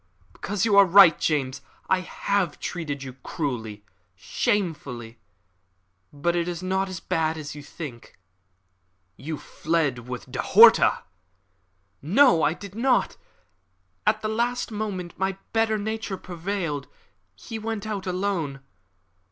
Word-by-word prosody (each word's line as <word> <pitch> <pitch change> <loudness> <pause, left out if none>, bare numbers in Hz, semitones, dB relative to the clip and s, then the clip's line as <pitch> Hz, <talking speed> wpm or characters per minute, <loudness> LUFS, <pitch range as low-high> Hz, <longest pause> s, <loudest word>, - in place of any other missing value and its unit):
"Because 200 -1 -2
you 210 -3 +3
are 200 - +9
right, 185 -3 +8
James. 135 -4 -1 0.3
I 190 - +3
have 185 -2 -1
treated 145 -6 -4
you 130 -1 -7
cruelly 110 -10 -4 0.3
shamefully. 125 - -2 0.9
But 160 +4 -1
it 170 0 0
is 175 0 -4
not 190 +1 0
as 185 -2 -5
bad 160 -1 -1
as 150 -2 -6
you 145 - -9
think." 140 -5 -9 1.0
"You 155 +2 -5
fled 145 -9 -2
with 125 -2 -7
De - - -2
Horta." - - +6 1.0
"No, 195 - +5
I 155 - +3
did 200 0 -10
not. 245 +3 +1 0.9
At 215 0 +2
the - - 0
last 235 +3 -1
moment 200 -5 -5
my 190 0 -1 0.2
better 225 -1 +2
nature 215 -1 -3
prevailed. 175 -5 -4 0.5
He 220 - -7
went 220 -1 -4
alone. 185 -8 -2
180 Hz, 125 wpm, -25 LUFS, 145-205 Hz, 1.0 s, are